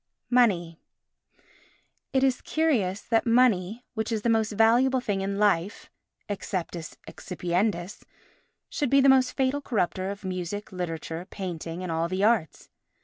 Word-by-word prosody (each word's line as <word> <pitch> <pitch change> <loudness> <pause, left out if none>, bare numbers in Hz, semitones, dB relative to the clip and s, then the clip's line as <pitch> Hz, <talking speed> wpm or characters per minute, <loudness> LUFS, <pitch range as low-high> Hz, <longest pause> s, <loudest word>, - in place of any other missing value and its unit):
Money 180 -10 +2 1.3
It 265 0 +2
is 260 -2 +2
curious 230 -12 0
that 230 +1 0
money, 230 -2 +2
which 220 -1 -3
is 220 -2 -2
the 235 - +2
most 220 -1 +1
valuable 240 +5 +4
thing 205 -6 -2
in 195 +1 -2
life, 200 -1 0 0.4
exceptis 180 -4 -5
excipiendis, 180 +2 -2 0.7
should 290 -5 -2
be 275 - +5
the 270 - +5
most 260 -1 +4
fatal 270 +2 0
corrupter 190 -7 -1
of 200 0 -7
music, 185 +2 -4
literature, 170 -1 -5
painting 175 -2 -5
and 180 - -4
all 165 +1 0
the 185 +3 -2
arts. 210 - +1
205 Hz, 140 wpm, -26 LUFS, 180-240 Hz, 1.3 s, be